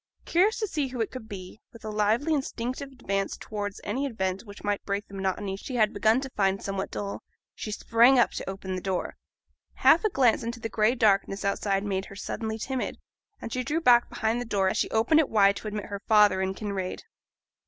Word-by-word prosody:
Curious 390 +6 +3
to 430 - -1
see 300 -7 -1
who 255 -1 -7
it 225 - -1
could 240 -4 -9
be, 190 +1 -9
with 230 -1 -13
a 215 - -3
lively 215 +9 +1
instinctive 265 -1 -3
advance 195 -6 -2
towards 205 -2 -5
any 265 +7 -1
event 190 -6 -2
which 205 -1 -12
might 205 -1 -1
break 200 0 -3
the - - -16
monotony 195 0 -2
she 250 +6 -7
had 215 -3 +3
begun 220 +4 +3
to 270 - -5
find 195 -3 +1
somewhat 195 0 -3
dull, 200 -1 -5 0.3
she - - -6
sprang 235 +5 +4
up 240 - +4
to - - -5
open 190 -1 -5
the 185 - -3
door. 190 -1 -2 0.6
Half 330 - +5
a 430 - +3
glance 255 - +3
into 235 +1 -4
the 225 - -4
gray 220 +3 +2
darkness 200 -3 +2
outside 195 0 0
made 195 -2 -2
her 195 - -11
suddenly 220 +2 -4
timid, 260 +3 -3 0.4
and 230 - -6
she 255 - -1
drew 300 +6 0
back 245 -6 +5
behind 225 +2 -1
the - - -1
door 195 -4 +1
as - - -2
she - - +1
opened 230 +8 +3
it 310 - +2
wide 200 -2 +4
to - - -7
admit 210 -1 -4
her 200 -1 -6
father 210 -3 +5
and 190 0 -2
Kinraid. 200 -3 -4
215 Hz, 215 wpm, -27 LUFS, 195-245 Hz, 0.6 s, Half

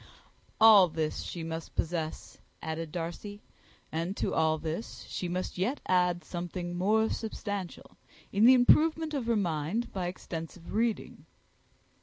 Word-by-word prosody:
"All 215 -4 +9
this 155 -1 -2
she 170 - -6
must 160 0 -6
possess," 160 -1 -3 0.2
added 160 0 -4
Darcy; 180 +5 -6 0.5
"and 165 +5 -2
to - - -1
all 160 -1 +2 0.2
she 180 - -6
must 180 +1 -3
yet 245 +10 0
add 180 -1 +2
something 175 0 -5
more 215 +5 +3
substantial 205 -5 -5 0.3
in 205 +3 +4
the 255 +2 +9
improvement 315 +5 +4
of 265 -5 -2
her 235 - +3
mind 175 +5 -1
by 185 -2 -2
extensive 170 -1 -7
reading." 225 0 -1
180 Hz, 130 wpm, -30 LUFS, 165-220 Hz, 0.5 s, All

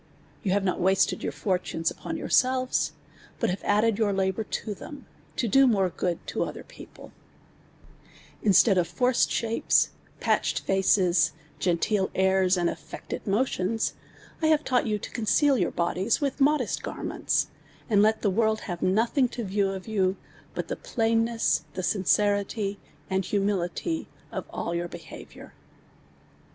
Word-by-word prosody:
\ - - -31
On 190 - +1
have 200 +1 +2
not 185 - 0
wasted 190 +1 +2
\(h\\' - - -5
lortinu's 180 -4 0
upon - - -6
yourselves, 255 0 +1 0.5
but. - - +1
have 190 - -5
.idded 210 +1 +2
ytuir 205 -3 +1
labour 190 +3 0
to 210 - -4
tlnin, 280 +7 -10 0.3
todo 265 +3 +4
luoi'e 195 -6 +2
i^ood 175 0 -1
to - - -1
other - - -6
pi'ople - - -13 1.3
Instead 200 -1 +5
of 170 - +1
forced 245 +9 +2
shapes, 230 0 +2 0.3
piitched - - +1
faces, 185 -4 +3 0.3
^t 175 -2 +1
nteel 195 +1 0
nirs, 190 0 +3
and 175 -1 +1
alVected - - -6
motions, 215 -1 0 0.5
I 315 - +3
have 310 -1 +3
taught 250 -2 +1
you 210 -1 0
to - - -8
con 230 - -4
ceal 275 +3 +4
your 175 - +1
bixlies 185 +5 0
with 280 -1 -2
nnxlest 295 +2 +2
•garments, - - -1 0.4
and 205 -4 +4
let 220 +1 +2
tlu» 200 -3 +2
world 220 +1 +1
have 175 -3 -5
nothing 230 +8 +2
to 240 - -5
view 200 0 0
of 190 0 -6
you, 195 -3 +1 0.4
but - - -3
the - - -3
plainness 225 -5 0
and 185 - -2
sincerity, 200 +1 +1 0.3
and 190 0 0
humility 200 - -1 0.2
of - - -4
all 170 - -3
your 175 0 -2
behavi(uir. - - -11
205 Hz, 150 wpm, -26 LUFS, 185-230 Hz, 1.3 s, Instead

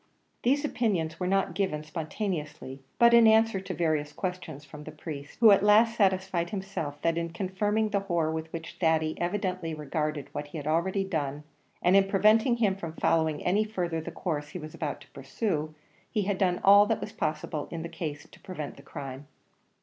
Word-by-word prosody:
These 280 +5 +2
opinions 190 - -1
were 180 - -1
not 195 -1 +1
given 175 -5 -1
spontaneously, 155 -4 -5 0.2
but 235 0 +6
in 235 -1 +8
answer 220 -2 +4
to 190 - -6
various 155 -3 0
questions 170 -5 -5
from 150 +2 -11
the 155 - -8
priest, 150 -2 -8
who 225 -2 +8
at 200 - +6
last 215 +3 +5
satisfied 190 -4 +1
himself 190 -7 -4
that 165 0 +2
in 170 0 -3
confirming 205 +5 -1
the 200 - +1
horror 170 -5 0
with 160 0 -4
which 165 0 -7
Thady 160 -2 +2
evidently 180 -3 -2
regarded 150 0 -3
what 145 - -5
he 155 - -8
had 145 - -6
already 170 +5 +1
done, 150 -6 -3 0.4
and 180 +2 +5
in 195 0 +5
preventing 215 +5 +4
him 210 -5 +2
from 165 -4 -6
following 160 -2 +1
any 200 +4 +3
further 175 -6 -2
the 160 - -6
course 155 -3 -3
he 180 - -7
was 155 -2 -8
about 150 -3 -4
to - - -17
pursue, 155 - -3 0.3
he 210 -3 0
had 195 -1 -1
done 180 -2 +1
all 205 +1 +7
that 225 - 0
was 215 - -6
possible 155 -5 -3
in 165 -1 -5
the - - -4
case 150 -3 -6
to - - -16
prevent 155 -6 -7
crime. 135 0 -8
170 Hz, 190 wpm, -28 LUFS, 155-200 Hz, 0.4 s, in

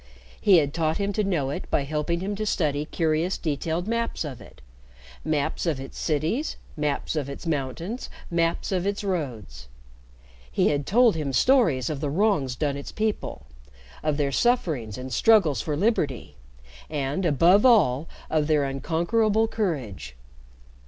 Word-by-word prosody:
He 200 -4 +6
had 145 -2 +1
taught 160 -1 0
him 200 0 -1
to 210 - 0
know 160 -9 0
it - - -6
by 140 - +1
helping 155 +4 -2
him 200 +2 -2
to 215 - -2
study 150 -6 0
curious 165 +3 0
detailed 160 +3 -2
maps 230 -6 -1
of 135 -5 -7
it - - -15 0.6
maps 155 +2 -1
of 150 -5 0
its 135 - -8
cities, 165 - -1 0.2
maps 150 +1 -2
of 145 -3 -2
its 140 - -8
mountains, 165 - -3 0.2
maps 170 +2 0
of 185 0 0
its 200 +1 -2
roads. 120 - -4 0.8
He - - +2
had 145 -1 -1
told 235 0 +5
him 150 -4 -2
stories 160 - +3
of 150 -3 -3
the 150 - -1
wrongs 155 - +1
done 140 0 -1
its 140 - -7
people, 215 -1 -3 0.6
of 155 -2 0
their 140 -2 0
sufferings 150 - 0
and 130 0 -6
struggles 170 - +4
for 150 -2 -2
liberty, 155 - 0 0.5
and, 145 +3 -2
above 170 +5 +4
all, 165 - +4 0.2
of 155 -2 +1
their 150 -2 +3
unconquerable 175 +11 +1
courage. 130 - -3
155 Hz, 155 wpm, -25 LUFS, 140-195 Hz, 0.8 s, He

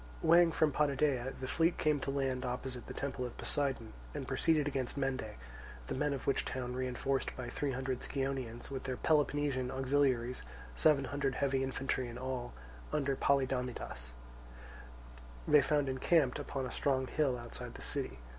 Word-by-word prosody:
Weighing 170 +1 +7
from 155 -1 +3
Potidæa, 140 -3 +1
the 130 - -4
fleet 165 +5 +2
came 150 -1 +2
to 140 - -3
land 135 -2 0
opposite 125 0 -4
the - - -6
temple 135 -2 -3
of 125 - -5
Poseidon, 135 -6 -1 0.2
and - - -4
proceeded 155 -3 +2
against 135 -2 -2
Mende; 130 -6 -1 0.5
the - - -3
men 150 +2 +1
of 135 -2 -3
which 140 - +2
town, 125 -1 -3
reinforced 130 +1 -1
by 125 -2 -4
three 140 -2 -1
hundred 130 0 -2
Scionaeans, 135 -3 -3
with 135 -1 -4
their 130 -2 -2
Peloponnesian 145 -4 +2
auxiliaries, 130 -2 +1 0.3
seven 145 -3 +4
hundred 140 -1 -1
heavy 135 -1 +1
infantry 130 -1 -1
in 120 0 -7
all, 130 -1 -3 0.4
under 140 -2 +1
Polydamidas, 130 - 0 1.4
they 150 -1 +7
found 145 0 +2
encamped 135 +1 +2
upon 135 -2 -3
a 125 - -5
strong 130 -2 +1
hill 135 -2 +1
outside 120 -1 -7
the - - -7
city. 65 - -2
135 Hz, 160 wpm, -34 LUFS, 125-145 Hz, 1.4 s, Weighing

